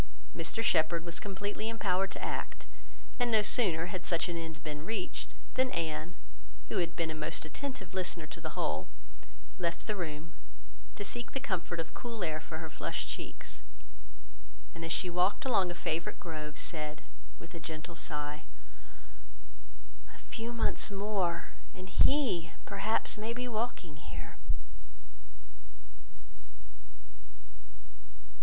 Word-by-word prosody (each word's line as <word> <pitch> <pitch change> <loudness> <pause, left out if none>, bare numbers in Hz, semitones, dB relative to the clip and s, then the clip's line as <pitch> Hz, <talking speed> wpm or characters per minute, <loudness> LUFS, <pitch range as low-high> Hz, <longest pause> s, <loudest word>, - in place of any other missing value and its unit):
Mr 225 - 0
Shepherd 165 -4 +4
was 170 -1 -2
completely 205 +2 -2
empowered 195 -4 +2
to - - -4
act; - - -2 0.5
and 245 -1 +4
no 220 -2 +6
sooner 180 -7 +6
had 180 0 -3
such 170 -1 +4
an 175 - -1
end 160 -2 -4
been 150 0 -3
reached, 200 0 -2 0.2
than 260 0 +4
Anne, 165 -2 -1 0.5
who - - +2
had 170 -1 +1
been 165 -2 +1
a - - -2
most 155 0 -1
attentive 190 - -4
listener 180 -3 0
to 160 +2 -7
the 160 -1 -4
whole, 75 0 +1 0.7
left 170 -1 0
the 215 - +1
room, 160 -3 -3 0.6
to 205 - -3
seek 240 +3 -2
the 270 - +1
comfort 180 -8 -1
of 165 - -3
cool 230 -4 -3
air 155 -2 +1
for 160 0 -5
her 160 0 -4
flushed - - -1
cheeks; 60 0 -6 1.1
and 165 - -6
as 165 - -2
she 180 - +3
walked 180 +6 +3
along 195 -8 +5
a 175 - -3
favourite 170 -1 -1
grove, 155 -3 -4
said, 155 -2 -2 0.3
with 165 - -10
a 170 - -5
gentle 160 +1 -5
sigh, 150 -2 -3 1.7
"A - - -12
few 230 +1 -4
months 235 - +3
more, 195 -4 +1 0.2
and 185 0 -7
he, 200 - +5 0.2
perhaps, 210 +2 +2
may 220 +2 -1
be 250 +1 -2
walking 215 -9 -1
here." 150 - -6
175 Hz, 140 wpm, -34 LUFS, 160-210 Hz, 1.7 s, no